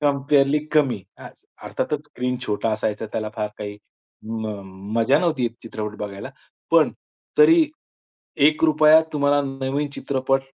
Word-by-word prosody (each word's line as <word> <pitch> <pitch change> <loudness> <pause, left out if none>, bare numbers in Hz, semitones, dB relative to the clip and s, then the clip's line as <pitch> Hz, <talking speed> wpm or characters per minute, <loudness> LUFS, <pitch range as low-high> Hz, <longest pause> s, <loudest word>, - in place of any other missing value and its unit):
कंपेअरली 140 0 +2
कमी, 135 -8 +2 0.2
हाच. - - -13 0.2
अर्थातच 150 -1 -3
स्क्रीन 125 -2 -3
छोटा 105 +2 -1
असायचा. 110 0 -2
त्याला 110 -1 -2
फार 105 -1 -1
काही 105 -1 -6 0.5
म 110 0 -4 0.5
मजा 115 +5 +4
नव्हती 155 -8 +1
चित्रपट 105 -2 -6
बघायला. 100 +4 -6 0.4
पण 165 -2 +5 0.5
तरी 335 -7 +7 0.8
₹1 155 0 +5
तुम्हाला 145 -1 +2
नवीन 135 +1 -3
चित्रपट 135 0 0
135 Hz, 120 wpm, -22 LUFS, 110-150 Hz, 0.8 s, तरी